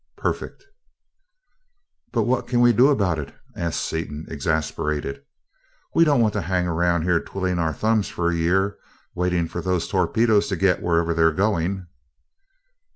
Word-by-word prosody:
Perfect!" - - -4 1.5
"But - - +1
what 125 +1 0
can 120 -1 +1
we 120 0 +5
do 125 +5 +5
about 100 - +1
it?" 70 - -7 0.2
asked 85 -1 -2
Seaton, 80 -1 -4
exasperated. 75 -2 -2 0.7
"We 165 - +5
don't 145 -5 +3
want 110 -2 +2
to 105 - -1
hang 90 0 0
around 85 -1 +1
here 90 -1 +2
twiddling 95 -1 -3
our 80 -1 +1
thumbs 110 +5 +1
for 85 0 -1
a - - -1
year 95 +4 +1 0.3
waiting 90 -1 0
for 85 - -5
those 90 0 -1
torpedoes 105 +3 +2
to 95 - -1
get 90 0 +2
to - - -11
wherever 85 -1 +2
they're 80 0 +3
going!" 95 0 -1
90 Hz, 155 wpm, -23 LUFS, 80-105 Hz, 1.5 s, we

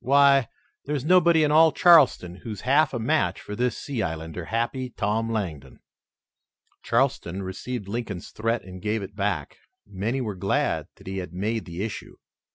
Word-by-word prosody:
"Why, 140 -1 +5 0.4
there's 145 -2 -2
nobody 170 -2 +5
in 150 - +2
all 160 +1 +6
Charleston 145 - +5
who's 105 -1 -7
half 140 +3 +3
a 125 - -3
match 110 - 0
for 105 - -7
this 125 +2 0
sea 135 -5 -4
islander, 80 +1 -4
Happy 120 +4 -2
Tom 110 +1 -1
Langdon." 90 -10 -4 1.0
Charleston 115 -7 0
received 100 +4 -5
Lincoln's 105 -4 -5
threat 115 +2 -1
and 95 -1 -10
gave 105 +1 -1
it 100 +1 -9
back. 100 -8 -2 0.3
Many 105 +6 -3
were 110 -5 -3
glad 95 +1 -1
that - - -18
he 95 0 -4
had 90 -2 -7
made 110 +5 -2
the 85 +2 -5
issue. 110 - -6
110 Hz, 165 wpm, -25 LUFS, 95-130 Hz, 1.0 s, all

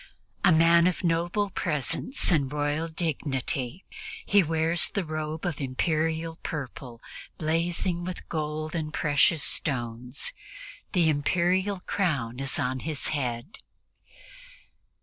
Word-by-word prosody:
A 195 - +6
man 170 +1 +6
of 180 - -1
noble 175 +4 +1
presence 165 - 0
and 150 -5 +3
of 135 - -8
royal 150 +2 0
dignity, 145 -2 -2 0.4
he 205 -1 +5
wears 165 0 +2
the 200 -4 -2
robe 155 +1 -4
of 165 -5 -2
Imperial 160 +4 -1
purple 130 -5 -6 0.4
blazing 170 +2 0
with 180 0 -6
gold 155 0 -3
and 155 -3 -2
precious 150 0 +3
stones; 125 -2 0 0.6
the 175 -3 +4
Imperial 180 +6 +1
crown 140 - -1
is 135 -1 -1
on 130 -3 -1
his 150 +1 -2
head. 130 - -3
160 Hz, 115 wpm, -27 LUFS, 140-170 Hz, 0.6 s, A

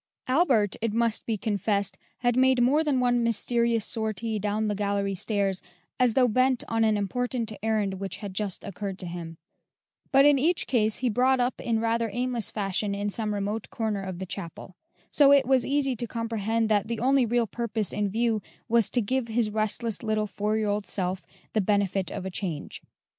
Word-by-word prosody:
Albert, 255 - +3
it 225 -2 -1
must 230 -1 0
be 225 -2 0
confessed, 205 -1 -1 0.3
had 245 -1 +2
made 260 0 +4
more 275 +6 +4
than 285 -4 +1
one 245 -1 +2
mysterious 230 0 +1
sortie 220 0 -2
down 210 +2 -1
the 210 - 0
gallery 200 -1 -1
stairs, 195 -1 -1 0.4
as 250 -3 +3
though 255 -2 +5
bent 255 +2 +2
on 225 0 +1
an 215 -1 +3
important 235 +3 -2
errand 210 -3 0
which 195 0 -4
had 200 -2 -7
just 200 -1 -3
occurred 200 -1 -5
to 190 - -6
him; 170 -2 -7 0.7
but 275 +1 +6
in 290 -2 +5
each 330 +5 +2
case 220 -4 +2
he - - +4
brought 255 +3 +3
up 245 +1 0
in 230 -2 0
rather 230 0 0
aimless 245 0 -1
fashion 200 0 -1
in 205 +1 -2
some 215 0 -2
remote 205 +1 -3
corner 220 -4 -2
of 190 -2 -5
the 190 - -5
chapel; 180 0 -7 0.4
so 280 -2 +6
it 280 -2 +6
was 260 -1 +2
easy 275 -2 +1
to 240 +1 -3
comprehend 225 -1 -1
that 210 -1 +1
the 230 -1 -3
only 265 +2 +3
real 240 0 +1
purpose 220 -2 -2
in 210 -1 0
view 225 +1 0 0.3
was 230 -2 +3
to 245 - +1
give 250 +3 -1
his 225 -1 0
restless 220 +1 -1
little 215 -1 0
four 210 +1 -1
year 215 -1 0
old 205 0 -1
self 185 -1 -2 0.3
the 215 - +2
benefit 200 -1 0
of 185 - -6
a 190 - -4
change. 175 -6 -4
220 Hz, 195 wpm, -27 LUFS, 200-240 Hz, 0.7 s, but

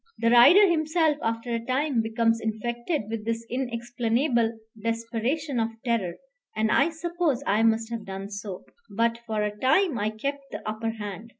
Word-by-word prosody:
The 230 0 +2
rider 345 +13 +8
himself 315 -2 +2
after 230 +1 -2
a 230 - 0
time 260 0 +1
becomes 225 0 +1
infected 235 +6 -2
with 220 -1 -4
this 230 +1 -2
inexplainable 235 -1 0 0.3
desperation 230 +5 -1
of 225 0 -1
terror, 210 -8 0 0.4
and 220 0 +1
I 280 +5 +4
suppose 330 -4 -1
I 210 +2 +2
must 225 0 +2
have 230 -3 -5
done 195 +1 -6
so; 200 -2 -6 0.2
but 230 +2 0
for 215 -1 -1
a 210 0 -2
time 260 - +2
I 210 +1 0
kept 275 +6 -4
the - - -7
upper 215 +1 -2
hand. 210 0 -6
230 Hz, 165 wpm, -26 LUFS, 220-265 Hz, 0.4 s, rider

